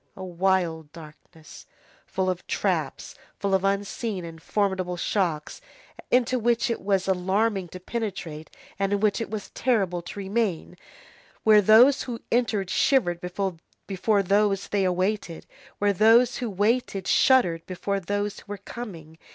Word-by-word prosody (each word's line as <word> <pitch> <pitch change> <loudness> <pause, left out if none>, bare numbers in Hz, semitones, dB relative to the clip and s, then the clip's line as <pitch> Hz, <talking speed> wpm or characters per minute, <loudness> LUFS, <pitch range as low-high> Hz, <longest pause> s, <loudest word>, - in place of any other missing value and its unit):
A 190 - -7
wild 175 -4 0
darkness, 155 0 -14 0.4
full 190 0 -2
of 185 -1 -3
traps, - - -2 0.2
full 200 -1 -1
of 190 0 +2
unseen 200 0 -2
and 165 -1 -10
formidable 190 -3 -1
shocks, 170 - -2 0.5
into 250 0 +2
which 235 +2 +1
it 230 - -3
was 195 -1 0
alarming 190 +1 0
to 185 - -10
penetrate, 180 -7 -5 0.3
and 195 0 0
in 200 - +1
which 210 +2 +1
it - - -4
was 215 -2 -6
terrible 195 -9 0
to 175 - -10
remain, 195 -3 -2 0.7
where 215 -1 +6
those 230 +7 +6
who 235 -3 -5
entered 220 -6 0
shivered 175 -11 +2
before 195 +2 -2
those 200 +1 +2
whom - - -12
they 200 -2 +1
awaited, 185 -1 -1 0.3
where 205 0 +2
those 225 +5 +5
who 245 - -3
waited 205 -1 0
shuddered 180 -12 +3
before 195 +2 -2
those 205 +2 -3
who - - -17
were 205 0 -5
coming. 175 -7 -9
195 Hz, 145 wpm, -25 LUFS, 180-215 Hz, 0.7 s, where